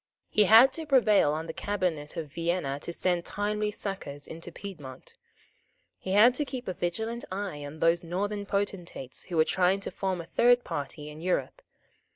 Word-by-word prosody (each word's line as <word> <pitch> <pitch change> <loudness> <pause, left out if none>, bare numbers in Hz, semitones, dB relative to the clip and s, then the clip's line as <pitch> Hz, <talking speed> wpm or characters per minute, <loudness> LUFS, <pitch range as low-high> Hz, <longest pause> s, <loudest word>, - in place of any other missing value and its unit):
He 210 - +4
had 225 +7 +8
to 320 -2 -6
prevail 215 - +4
on 155 +2 -3
the 160 - -6
Cabinet 180 -8 -2
of 155 -4 -5
Vienna 165 -5 -1
to 170 - -6
send 175 0 0
timely 210 +2 -1
succours 190 -9 -6
into 165 +2 -9
Piedmont. 150 -10 -10 0.9
He 190 - -3
had 225 +5 +7
to 295 - 0
keep 260 -3 -6
a 185 - -1
vigilant 220 +8 -3
eye 190 -6 -4
on 145 +2 -9
those 165 +1 +3
Northern 200 +4 -3
potentates 185 -10 -3
who 175 - -4
were 160 - +5
trying 185 +3 +2
to - - -5
form 190 -2 -2
a 165 - -6
third 245 +7 +4
party 145 +1 -5
in 150 +1 -10
Europe. 185 - -1
185 Hz, 180 wpm, -28 LUFS, 160-210 Hz, 0.9 s, had